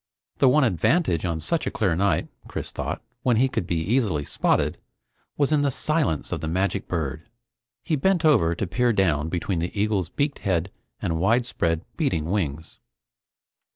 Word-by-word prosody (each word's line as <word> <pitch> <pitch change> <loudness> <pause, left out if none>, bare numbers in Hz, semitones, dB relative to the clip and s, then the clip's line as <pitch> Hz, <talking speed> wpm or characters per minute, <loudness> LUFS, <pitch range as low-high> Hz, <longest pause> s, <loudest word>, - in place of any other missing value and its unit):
The 135 - +6
one 150 +3 +4
advantage 100 - +2
on 85 -2 -1
such 160 - -1
a - - +2
clear 105 -11 0
night, 95 -2 +1 0.2
Chris - - -5
thought, - - -4 0.2
when 120 -3 +2
he 130 +3 +4
could 95 -8 -3
be 90 - -1
easily 95 - 0
spotted, - - 0 0.6
was 145 0 +2
in 150 -2 +3
the 145 - +2
silence 150 - 0
of - - -2
the 80 - -3
magic 95 +4 -1
bird. 80 - -3 0.5
He 160 - 0
bent 175 +3 +2
over 85 - +4
to 100 - -2
peer 120 +7 +1
down 80 -6 +1
between 90 +1 -1
the 85 +5 -3
eagle's 100 -5 0
beaked 145 +5 -1
head 95 -1 -1 0.3
and 80 -1 -1
widespread, 95 -5 +1
beating 90 - 0
wings. 80 -6 -3
95 Hz, 170 wpm, -24 LUFS, 80-130 Hz, 0.6 s, The